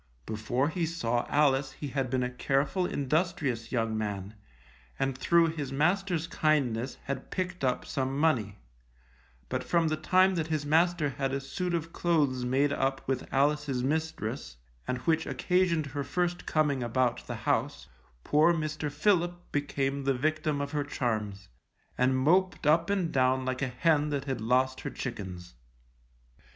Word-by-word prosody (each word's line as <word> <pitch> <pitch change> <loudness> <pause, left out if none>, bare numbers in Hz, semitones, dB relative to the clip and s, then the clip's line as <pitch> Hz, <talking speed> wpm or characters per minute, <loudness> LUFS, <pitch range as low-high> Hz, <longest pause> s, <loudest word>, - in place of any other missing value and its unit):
Before 120 +6 -1
be 165 0 -1
saw 120 -8 -1
Alice 135 -2 +2
he 145 - -6
had 135 -1 -1
been 125 0 0
a 125 - -1
careful, 140 +8 0
industrious 140 -5 -1
young 115 -3 0
man, 105 -2 -3 0.6
and 135 -1 0
through 165 +5 +3
his 150 -4 -4
master's 175 +3 +1
kindness 135 -7 0
had 135 -1 -5
picked 180 -3 -3
up 125 -1 0
some 135 0 -2
money; 120 -10 +1 0.9
but 130 0 -2
from 170 -2 +2
the 155 - +1
time 185 +4 +4
that 165 -3 -1
his 155 -2 -1
master 165 0 +3
had 135 0 -2
a 135 - -1
suit 175 +6 -3
of 165 0 -4
clothes 145 -7 +1
made 135 +3 +2
up 135 -1 -1
with 130 -1 -2
Alice's 140 -2 +1
mistress, 155 - -2 0.3
and 125 - -1
which 160 +4 +1
occasioned 180 -4 +1
her 140 +1 -4
first 175 +3 -2
coming 150 -4 +1
about 120 0 0
the - - -4
house, - - 0 0.4
poor 160 +3 +4
Mr. 155 -1 -3
Philip 175 +2 0
became 140 -1 -1
the 135 -1 +2
victim 155 +2 0
of 140 0 -3
her 150 -1 0
charms, 110 -8 -3 0.5
and 130 +1 +2
moped 180 +7 +2
up 165 +4 +4
and 190 -5 0
down 130 0 +2
like 130 0 -2
a 140 - +1
hen 150 +4 +2
that 140 -2 -2
had 135 -5 -3
lost 130 +3 +1
her - - -4
chickens. 95 -8 -6
140 Hz, 160 wpm, -29 LUFS, 130-160 Hz, 0.9 s, time